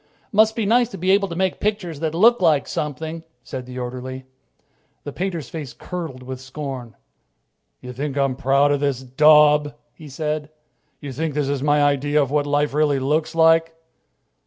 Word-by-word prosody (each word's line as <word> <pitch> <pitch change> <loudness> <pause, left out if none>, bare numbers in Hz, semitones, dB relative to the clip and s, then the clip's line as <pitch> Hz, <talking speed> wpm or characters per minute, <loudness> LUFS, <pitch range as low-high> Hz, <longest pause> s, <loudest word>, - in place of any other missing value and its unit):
"Must 220 +1 +4
be 225 - -1
nice 235 +3 +3
to 195 - -8
be 185 +2 +1
able 200 0 +3
to 170 - -6
make 185 +1 -1
pictures 195 -7 -2
that 160 0 -2
look 230 +5 +5
like 155 -5 +3
something," 160 +2 -4 0.2
said 125 -1 -7
the 125 0 -8
orderly. 130 +1 -6 0.8
The 145 - -7
painter's 175 -7 -3
face 150 -6 -7
curdled 160 -8 -7
with 130 0 -7
scorn. 130 -4 -7 0.9
"You 125 0 -8
think 140 +2 -4
I'm 135 -2 +1
proud 140 +2 +2
of 145 - +1
this 140 -3 -1
daub?" 150 +2 +4 0.2
he 155 -2 -12
said. 150 +1 -3 0.5
"You 140 -2 -6
think 155 +2 -3
this 145 -2 0
is 140 -2 -1
my 145 0 +3
idea 145 +1 +2
of 140 -2 0
what 145 -1 +1
life 145 0 0
really 150 -1 +2
looks 150 +5 -1
like?" 165 0 +4
150 Hz, 180 wpm, -21 LUFS, 135-165 Hz, 0.9 s, look